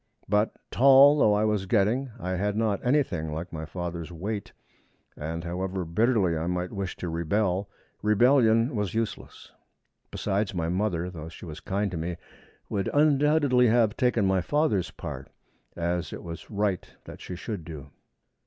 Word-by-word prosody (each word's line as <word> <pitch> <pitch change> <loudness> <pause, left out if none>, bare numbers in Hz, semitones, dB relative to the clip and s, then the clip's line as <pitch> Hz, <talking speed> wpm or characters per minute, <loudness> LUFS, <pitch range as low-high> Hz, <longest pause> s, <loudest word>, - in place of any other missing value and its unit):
But, 105 +2 +1 0.2
tall 140 +3 +7
though 105 -5 +5
I 105 +1 +2
was 105 -3 0
getting, 115 +7 +2
I 90 -4 -3
had 100 +3 -1
not 110 -3 0
anything 120 - +1
like 85 +4 -5
my 80 -1 -5
father's 85 0 -5
weight, 100 +5 -5 0.6
and, 80 +2 -5
however 90 +1 -3
bitterly 95 0 +2
I 80 +1 -2
might 90 0 -2
wish 100 -2 -4
to 90 - -5
rebel, 90 +4 0 0.3
rebellion 115 +2 +4
was 105 -2 -2
useless. 115 -1 -4 0.6
Besides, 100 0 -2
my 85 -1 -1
mother, 90 -2 -1
though 80 -2 -8
she 85 - -11
was 80 -2 -8
kind 100 0 -2
to 90 - -4
me, 85 +1 -3 0.5
would 100 -2 -2
undoubtedly 145 -3 +4
have 110 -2 +3
taken 125 -5 +2
my 95 -1 +2
father's 145 - +1
part, 65 -5 -8 0.5
as 85 0 -2
it - - -7
was 85 -1 -8
right 100 -3 -2
that - - -11
she 90 - -6
should 100 -1 -5
do. 75 -3 -9
100 Hz, 160 wpm, -27 LUFS, 85-110 Hz, 0.6 s, tall